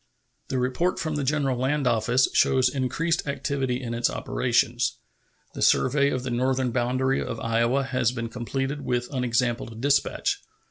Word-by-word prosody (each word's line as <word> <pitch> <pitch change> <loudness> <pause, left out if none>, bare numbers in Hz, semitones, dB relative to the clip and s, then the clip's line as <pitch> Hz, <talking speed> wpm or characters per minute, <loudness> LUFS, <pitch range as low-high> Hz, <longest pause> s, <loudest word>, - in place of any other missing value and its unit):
The 130 - -2
report 130 +9 0
from 155 -1 -2
the 145 - -1
General 135 -1 +1
Land 140 +2 0
Office 120 +2 +3
shows 130 -1 +4
increased 145 +6 -1
activity 140 -3 -1
in 120 -3 -5
its 120 0 +1
operations. 125 0 0 0.6
The - - -7
survey 140 +2 +3
of 130 -2 -2
the 130 - -3
northern 130 +1 0
boundary 130 +2 0
of 115 - -5
Iowa 115 +4 +1
has 130 -3 0
been 115 -2 -4
completed 135 +4 -3
with 120 +2 -2
unexampled 120 -2 -1
dispatch. 140 +3 +1
130 Hz, 150 wpm, -25 LUFS, 120-135 Hz, 0.6 s, shows